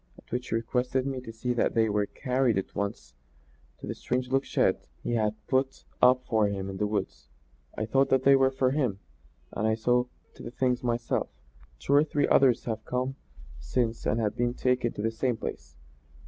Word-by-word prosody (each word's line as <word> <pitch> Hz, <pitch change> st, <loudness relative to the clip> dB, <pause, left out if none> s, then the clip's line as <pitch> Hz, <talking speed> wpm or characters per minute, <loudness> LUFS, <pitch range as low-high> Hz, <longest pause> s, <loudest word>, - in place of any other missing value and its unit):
At -, -, -19 dB
which 125 Hz, +1 st, -3 dB
he -, -, 0 dB
requested 125 Hz, +3 st, 0 dB
me 135 Hz, -2 st, -3 dB
to 115 Hz, -, -8 dB
see 125 Hz, +2 st, -2 dB
that 120 Hz, -, 0 dB
they 110 Hz, -1 st, +4 dB
were 105 Hz, -1 st, 0 dB
carried 125 Hz, -4 st, 0 dB
at 95 Hz, -, -3 dB
once 100 Hz, 0 st, -4 dB, 0.6 s
to -, -, -9 dB
the -, -, -3 dB
strange 125 Hz, 0 st, -2 dB
looking 135 Hz, +1 st, +1 dB
shed -, -, +1 dB, 0.2 s
he -, -, -2 dB
had 110 Hz, -2 st, +2 dB
had -, -, -37 dB
put 130 Hz, 0 st, 0 dB, 0.2 s
up 125 Hz, 0 st, +5 dB
for 110 Hz, -3 st, +2 dB
him 100 Hz, -1 st, -3 dB
in 95 Hz, -, -7 dB
the 105 Hz, -, 0 dB
woods. 70 Hz, -, -4 dB, 0.5 s
I 110 Hz, -, -1 dB
thought 135 Hz, +4 st, +2 dB
that 130 Hz, -1 st, +3 dB
they 140 Hz, 0 st, +7 dB
were 135 Hz, 0 st, +4 dB
for 130 Hz, -1 st, +1 dB
him, 130 Hz, -9 st, 0 dB, 0.5 s
and 110 Hz, -, -1 dB
I 110 Hz, -, +2 dB
saw 125 Hz, +2 st, +2 dB, 0.3 s
to -, -, -14 dB
the -, -, -6 dB
thing 125 Hz, +1 st, +1 dB
myself. 120 Hz, -2 st, -1 dB, 0.5 s
Two 140 Hz, -, -1 dB
or 145 Hz, +1 st, +6 dB
three 150 Hz, -1 st, 0 dB
others 130 Hz, -3 st, +4 dB
have 110 Hz, -2 st, -3 dB
come 130 Hz, +2 st, -2 dB, 0.4 s
since 115 Hz, -, -1 dB
and 110 Hz, -2 st, 0 dB
been 120 Hz, 0 st, 0 dB
taken 125 Hz, -2 st, +1 dB
to 105 Hz, -, -5 dB
the 115 Hz, -, +1 dB
same 120 Hz, +1 st, -1 dB
place. 65 Hz, -, -7 dB
120 Hz, 205 wpm, -28 LUFS, 110-130 Hz, 0.6 s, they